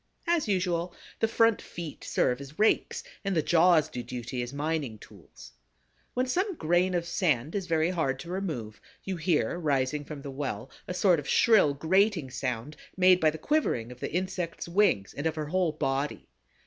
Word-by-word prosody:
As 335 -6 +1
usual, 180 -3 0 0.2
the 225 - +3
front 225 0 +3
feet 170 -4 -8
serve 125 +2 0
as 140 +3 -11
rakes 215 - +2 0.2
and 195 -2 -1
the 160 - +2
jaws 170 -2 +4
do 125 - -5
duty 125 +1 -5
as 120 0 -5
mining 145 -5 -2
tools. 95 - -15 0.6
When 250 +1 +1
some 370 +9 0
grain 175 - +1
of 170 -1 0
sand 155 -5 0
is 195 -3 -3
very 165 0 +2
hard 150 -7 0
to 175 - -8
remove, 145 - -4 0.2
you 190 - -3
hear 170 +1 0
rising 145 -2 0
from 145 -1 -8
the 140 - -6
well 135 -3 -4 0.2
a 180 - -4
sort 180 -3 +4
of 140 - -7
shrill 210 -12 +5
grating 170 -1 +2
sound 130 +2 -4 0.2
made 185 -1 +6
by 160 - +4
the 155 - -5
quivering 155 - 0
of 125 - -11
the - - -4
insect's 180 -1 -3
wings 170 - +2
and 145 +3 -2
of 160 - -2
her 155 -1 -3
whole 180 -2 +1
body. 140 -1 -2
160 Hz, 185 wpm, -28 LUFS, 135-185 Hz, 0.6 s, made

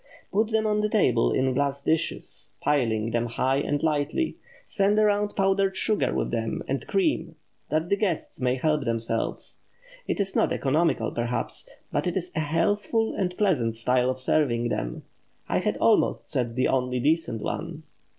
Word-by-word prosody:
Put 215 +2 +2
them 220 -1 +1
on 210 0 +2
the 210 - 0
table 130 - +3
in 130 0 +1
glass 140 +1 -1
dishes, 160 +2 -2
piling 115 -6 +1
them 120 +1 0
high 130 +3 0
and 145 +1 -1
lightly, 155 - 0 0.3
send 200 +1 +1
around 210 -1 +2
powdered 195 0 +2
sugar 215 - +1
with - - -1
them - - -2
and - - -3
cream, 345 -6 0 0.3
that 155 +2 0
the 200 - +2
guests 195 -9 -2
may 125 0 +2
help 150 +2 +1
themselves. 115 -1 -2 0.5
It - - -1
is 195 -1 0
not - - +2
economical 155 +5 +1
perhaps, 120 0 -3 0.2
but - - 0
it 180 - -1
is 180 -1 -3
a - - 0
healthful 205 +8 +1
and 180 -2 -2
pleasant 135 - +1
style 125 +2 +2
of 130 0 -2
serving 125 -4 +1
them—I - - -5
had - - -1
almost - - +2
said 120 -2 -1
the 130 - +2
only 125 -1 0
decent 145 -5 0
one. - - -4
150 Hz, 165 wpm, -26 LUFS, 125-195 Hz, 0.5 s, table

